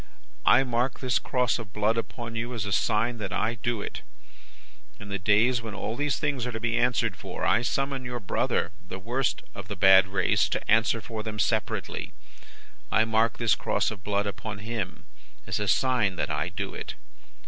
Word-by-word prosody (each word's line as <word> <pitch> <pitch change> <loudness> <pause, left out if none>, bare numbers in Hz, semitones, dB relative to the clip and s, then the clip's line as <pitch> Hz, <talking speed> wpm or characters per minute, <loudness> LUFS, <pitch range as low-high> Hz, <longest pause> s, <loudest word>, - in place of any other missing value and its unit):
I - - +7
mark 125 0 0
this 125 -4 +1
cross 125 -1 +1
of 105 -3 -9
blood 105 +2 +2
upon 115 0 -4
you, 120 +2 -3
as 105 -4 -2
a 100 - -3
sign 115 +4 +1
that 100 -3 -4
I 110 +5 0
do 120 -4 -1
it. - - -6 1.0
In 100 - -9
the 100 0 -2
days 110 +6 +3
when 110 -2 -6
all 110 - -3
these 145 0 0
things 140 -5 -1
are - - -3
to 115 - -4
be 120 0 0
answered 125 0 +2
for, - - -5
I 115 - +4
summon 135 +2 -1
your 125 -1 -4
brother, 100 - 0 0.2
the 95 - -5
worst 120 +7 -1
of 100 -1 -8
the 105 - -4
bad 95 0 +7
race, 95 -1 +2
to - - -2
answer 115 +1 +3
for 110 +1 -5
them 105 -1 -5
separately. 105 - -1 0.8
I 110 - +4
mark 110 +1 +2
this 115 -2 +3
cross - - 0
of 100 -2 -9
blood 100 0 0
upon 105 +1 -5
him, 110 -6 -4 0.4
as - - -2
a 105 - -1
sign 120 -4 +2
that - - -2
I - - -1
do - - -4
it. - - -6
115 Hz, 195 wpm, -27 LUFS, 105-120 Hz, 1.0 s, I